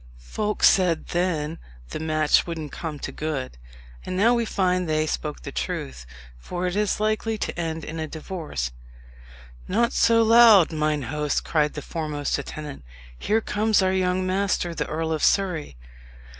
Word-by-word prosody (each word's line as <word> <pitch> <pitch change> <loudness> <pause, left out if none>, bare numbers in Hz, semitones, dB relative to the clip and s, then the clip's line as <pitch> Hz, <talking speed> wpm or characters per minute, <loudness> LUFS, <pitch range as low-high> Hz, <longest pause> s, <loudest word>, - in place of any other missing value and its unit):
Folks 210 - +1
said 180 -4 +3
then 165 -3 -1 0.3
the - - -5
match 155 0 +2
wouldn't 160 -4 -5
come 160 -3 -5
to - - -6
good; 135 - -4 0.4
and 185 - -4
now 225 +5 +4
we 235 -1 +1
find 185 -4 0
they 155 0 +1
spoke 150 -1 -4
the - - -6
truth, 60 -2 -4 0.3
for 175 - -4
it 180 0 -1
is 210 -1 0
likely 215 +1 0
to - - -3
end 165 -2 -3
in 160 +1 -6
a 155 - -3
divorce." 155 - -5 1.0
"Not 235 +6 +1
so 230 0 +4
loud, 225 -6 +7
mine 155 -2 0
host!" 150 +3 -1
cried 150 -2 +1
the 150 - -5
foremost 150 -4 -2
attendant; 145 - -7 0.3
"here 215 - 0
comes 215 -1 +1
our 185 0 +2
young 185 0 +1
master, 185 -2 0
the - - -3
Earl 160 +1 -2
of 155 - -2
Surrey." 175 - +1
165 Hz, 160 wpm, -24 LUFS, 150-195 Hz, 1.0 s, loud